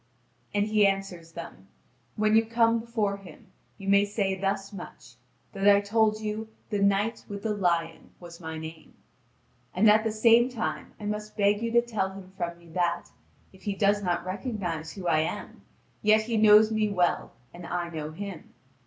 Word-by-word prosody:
And 205 0 +1
he 210 -1 +5
answers 195 -4 -3
them: 165 - -9 0.5
"When 215 0 +2
you 225 - +6
come 230 0 +2
before 220 -3 -1
him, 195 -3 -15 0.3
you 195 - -9
may 200 0 +5
say 205 -1 -1
thus 195 +1 -2
much: 175 -9 -10 0.4
that 195 0 -1
I 200 0 +7
told 215 +1 +1
you 215 +1 -4 0.2
'The 205 - 0
Knight 200 +3 +1
with 200 -1 -6
the 220 -1 0
Lion' 170 -5 -1
was 170 -1 -11
my 160 -2 -6
name. 160 0 -9 0.8
And 200 +5 +4
at 215 +1 +6
the 225 - 0
same 230 +3 +5
time 155 - -4
I 210 - -7
must 210 +1 -4
beg 205 +1 +3
you 230 - -1
to 235 0 +5
tell 200 -5 -2
him 190 -1 -11
from 170 -2 -4
me 170 -1 -18
that, 175 +1 -1 0.4
if 190 - -18
he 200 0 -3
does 205 +1 +2
not 175 -2 -1
recognise 185 -6 -4
who 190 -3 -8
I 160 -2 +3
am, 160 - -4 0.4
yet 215 +1 +4
he 230 +1 -2
knows 215 0 +6
me 215 -1 +1
well 180 -3 0 0.2
and 175 0 -9
I 175 -1 -2
know 155 -2 -5
him. 185 +1 -8
200 Hz, 185 wpm, -27 LUFS, 175-215 Hz, 0.8 s, I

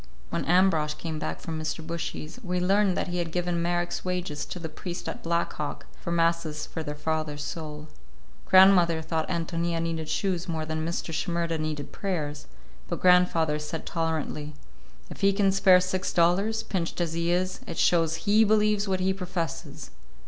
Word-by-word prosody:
When 170 - -1
Ambrosch 165 -4 +3
came 160 -2 -5
back - - -4
from 160 -1 -4
Mr. 155 +1 -4
Bushy's, 165 +2 -5
we 180 -2 -1
learned 195 +1 +3
that - - -1
he 175 0 -2
had 170 -1 -2
given 175 0 -1
Marek's 175 0 -1
wages 180 -5 -3
to - - -6
the 170 -2 -5
priest 175 +3 -6
at 240 - -5
Black 170 0 0
Hawk, 150 -1 -5 0.2
for 170 - -4
masses 165 -2 +1
for 160 - -6
their 150 -1 -5
father's 155 -1 -2
soul. 150 -1 -6 0.6
Grandmother 180 -4 +6
thought 160 0 -2
Ántonia 170 -1 -1
needed 165 -1 -3
shoes 185 -3 -1
more 160 -2 -2
than 155 0 -2
Mr. 165 0 -3
Shimerda 170 0 -1
needed 155 -2 -3
prayers, 150 -7 -3 0.4
but 170 - -3
grandfather 175 -4 +4
said 150 +2 -5
tolerantly, 155 -2 -2 0.6
"If - - -9
he 195 - +5
can 195 -1 +3
spare 190 -1 +6
six 185 +1 -1
dollars, 195 +6 +2
pinched 180 -5 -3
as 170 -2 -1
he 170 +1 0
is, 185 +1 0
it - - -6
shows 165 -2 +2
he 215 +2 +5
believes 210 -1 +3
what 190 -1 0
he 190 +1 +2
professes." 180 -4 -5
170 Hz, 175 wpm, -27 LUFS, 160-185 Hz, 0.6 s, Grandmother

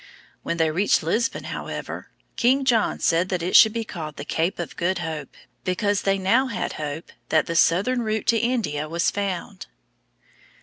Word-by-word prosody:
When 170 - -3
they 160 -1 +2
reached 190 +3 +2
Lisbon, 230 +11 0
however, - - -6 0.3
King 265 +2 +2
John 235 -4 +2
said 170 +3 +2
that 180 -3 -1
it 180 - -1
should 220 - +9
be 230 +1 -2
called 160 -8 -7
the - - -7
Cape 165 +3 -1
of 175 -4 -5
Good 180 +2 0
Hope, 160 -5 -5 0.3
because 200 +2 0
they 195 0 +1
now 230 +8 +2
had 205 -7 -3
hope 150 +3 -5 0.2
that 155 -2 +3
the 170 - -4
southern 200 +10 +3
route 220 -1 -2
to 230 - +4
India 210 -11 -1
was 170 +1 +1
found. 190 - -4
185 Hz, 175 wpm, -24 LUFS, 165-220 Hz, 0.3 s, should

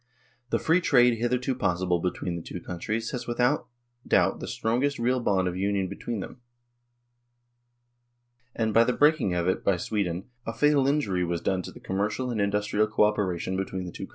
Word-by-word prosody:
The - - +2
Free 165 +3 +2
Trade 125 -7 +4
hitherto 125 +2 0
possible 90 -6 0
between 90 0 -2
the 85 - -5
two 90 - -7
countries 110 +8 -4
was 125 - -4
without 120 +3 +1 0.4
doubt - - +3
the - - -6
strongest 125 +6 0
real 125 +2 +1
bond 95 -5 +1
of 90 - -2
union 95 0 0
between 105 +2 -4
them, 125 - -9 2.1
and 110 -2 0
by 115 - +6
the 125 - +1
breaking 145 - +3
of 85 0 0
it 95 - 0
by 100 -2 +2
Sweden 90 -2 -2 0.2
a 115 - -4
fatal 145 +1 +3
injury 120 -11 +1
was 85 -1 -1
done 95 +1 0
to - - -8
the - - -13
commercial 105 +6 -2
and 110 -3 -1
industrial 105 +1 +1
co 110 0 +2
operation 95 -4 0
between 95 -1 -3
the 90 - -6
two - - -7
countries. - - -20
105 Hz, 185 wpm, -27 LUFS, 95-125 Hz, 2.1 s, by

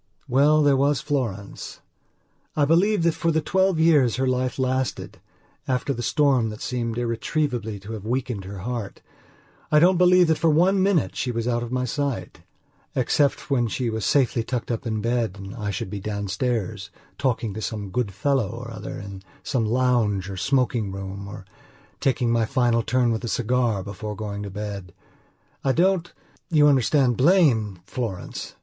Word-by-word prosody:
Well, 150 +4 +4
there 145 -1 +4
was 140 0 +2
Florence: 115 -10 -4 0.8
I 150 - +3
believe 180 +5 +3
that 170 -1 +3
for 165 - -1
the 160 - +2
twelve 190 +2 +1
years 150 -8 +4
her 130 - 0
life 130 0 0
lasted, 130 -1 -2 0.5
after 130 +2 0
the 120 - -5
storm 135 -4 +2
that 105 0 -8
seemed 115 -2 -3
irretrievably 120 -2 -2
to 105 +3 -9
have 105 -3 -6
weakened 120 -3 -2
her 95 -1 -7
heartI 120 -3 -5 0.8
don't 180 +2 +4
believe 180 0 +6
that 160 -2 +2
for 165 - +3
one 180 +5 +3
minute 190 -5 +2
she 125 - -2
was 115 0 -2
out 120 -1 +1
of 120 0 -5
my 125 0 0
sight, 140 0 -3 0.6
except 140 +3 +1
when 120 -4 +2
she 125 0 -2
was 110 -1 -3
safely 125 -3 +2
tucked 120 0 -3
up 120 +2 -3
in 110 -1 -1
bed 115 -3 0
and 95 +1 -8
I 105 -4 -4
should 95 -1 -4
be 105 - -4
downstairs, 105 +1 -2 0.3
talking 120 -5 0
to 110 - -6
some 105 -3 -4
good 120 -3 -1
fellow 130 +1 0
or 120 +2 -7
other 110 - -7
in 100 -1 -8 0.2
some 120 -4 0
lounge 110 -5 +1
or - - -5
smoking 120 -1 0
room 95 +1 -6
or 100 -1 -9 0.5
taking 125 -3 +1
my 115 -1 +2
final 120 -2 +2
turn 125 +1 +1
with 115 +1 -2
a - - -3
cigar 120 -3 0
before 105 +2 -6
going 100 -1 -5
to 100 - -5
bed. 100 -2 -6 0.7
I 135 - +2
don't, 175 +1 +2 0.4
you 150 -4 +5
understand, 135 -2 +3
blame 125 - +3
Florence. 110 -7 -5
120 Hz, 170 wpm, -24 LUFS, 105-140 Hz, 0.8 s, believe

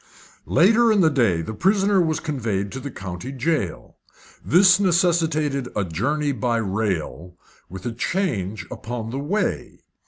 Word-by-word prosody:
Later 225 +6 +4
in 210 -3 +3
the 160 -2 +4
day 110 - +1
the 110 - -6
prisoner 195 - +2
was 160 -2 0
conveyed 110 -10 -3
to 135 - -6
the 140 - -6
county 95 +2 -7
jail. 135 - -3 0.5
This 185 +3 +5
necessitated 165 -7 +1
a 105 - 0
journey 145 - -1
by 125 -3 -1
rail, 95 -5 -3 0.3
with 95 +1 -9
a 120 - -2
change 115 - -2
upon 115 -1 -6
the 135 - -3
way. 195 +10 -3
135 Hz, 145 wpm, -22 LUFS, 105-170 Hz, 0.5 s, This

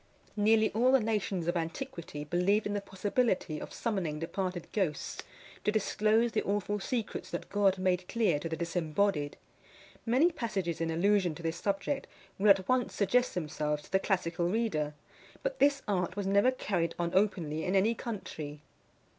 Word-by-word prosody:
Nearly 220 +1 +4
all 245 +4 +3
the 270 - +6
nations 210 -6 -1
of 175 - +1
antiquity 170 - -4
believed 180 +7 +2
in 205 - -1
the 205 - -1
possibility 195 -4 0
of - - -7
summoning 190 -10 -2
departed 180 +2 -3
ghosts 175 -9 -1 0.4
to 210 - +2
disclose 215 +2 +2
the 215 - +1
awful 205 +1 -1
secrets 230 +2 -3
that - - -5
God 200 -2 +3
made 185 -1 0
clear 220 -10 +1
to 165 - -4
the 160 - -3
disembodied. 165 -1 0 0.7
Many 260 +9 +4
passages 195 - -2
in 165 - 0
allusion 180 0 +2
to 170 - -10
this 165 0 -2
subject 200 +10 -1 0.3
will 205 +2 +4
at 190 -2 +5
once 255 -1 +1
suggest 245 +5 +2
themselves 150 -3 -2
to - - -17
the 190 - +4
classical 175 -3 0
reader; 175 -9 0 0.5
but - - -2
this 280 -1 +3
art 180 -3 0
was 200 -1 -2
never 200 +5 +4
carried 180 -10 -1
on 170 -1 -1
openly 175 -6 +1
in 185 +4 0
any 205 +4 +4
country. 160 -11 -6
195 Hz, 165 wpm, -31 LUFS, 170-215 Hz, 0.7 s, the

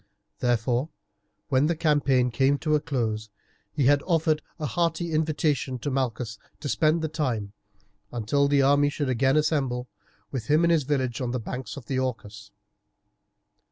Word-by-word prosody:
Therefore, 120 +3 +1 0.6
when 135 +1 +3
the 170 - +1
campaign 145 -6 +2
came 135 +4 +2
to 155 +1 -1
a 150 - +4
close, 115 -8 -2 0.4
he 145 -4 0
had 145 +1 +5
offered 160 -3 +2 0.2
a 155 - -4
hearty 170 +1 -1
invitation 155 -4 0
to 140 +4 -3
Malchus 120 -4 -2 0.2
to 145 - -5
spend 155 +3 +2
the - - +1
time, 125 -10 -2 0.6
until 120 +5 +1
the 140 -1 +3
army 145 +1 +4
should 145 -2 -2
again 135 +3 +2
assemble, 135 -5 0 0.4
with 125 -5 -4
him 155 +3 +4
in 170 - +4
his 160 -5 +2
village 130 -5 -1
on 125 - -1
the 125 +1 -2
banks 125 +6 -6
of 130 - -9
the 130 +1 -1
Orcus. 110 -4 -4
140 Hz, 160 wpm, -26 LUFS, 125-155 Hz, 0.6 s, had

